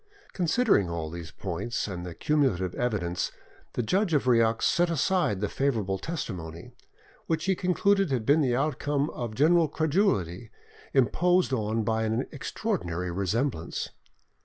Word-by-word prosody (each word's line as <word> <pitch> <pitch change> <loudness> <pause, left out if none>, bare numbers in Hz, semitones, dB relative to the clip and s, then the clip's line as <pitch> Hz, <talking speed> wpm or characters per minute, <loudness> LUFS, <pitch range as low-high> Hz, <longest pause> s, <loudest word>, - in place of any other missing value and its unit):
Considering 180 - +2
all 80 -2 -4
these 85 -1 -7
points, 100 +8 -3
and 90 -3 -5
the 90 -2 -7
cumulative 120 - +1
evidence, 100 -8 -1 0.4
the 125 - -1
judge 185 - +1
of 145 - +2
Rieux 115 -2 +3
set 175 0 +2
aside 165 - +1
the 105 - +1
favourable 110 -9 -1
testimony, 90 - -5 0.6
which 160 -1 0
he 190 - +3
concluded 195 +1 +2
had 125 -5 -1
been 145 +6 +4
the 125 -4 +2
outcome 145 +1 0
of 115 -3 -5
general 160 +4 +4
credulity, 145 - 0 0.4
imposed 175 - +3
on 110 -1 0
by 110 +1 0
an 110 +1 0
extraordinary 85 +1 -3
resemblance. 100 - -2
120 Hz, 135 wpm, -27 LUFS, 95-160 Hz, 0.6 s, been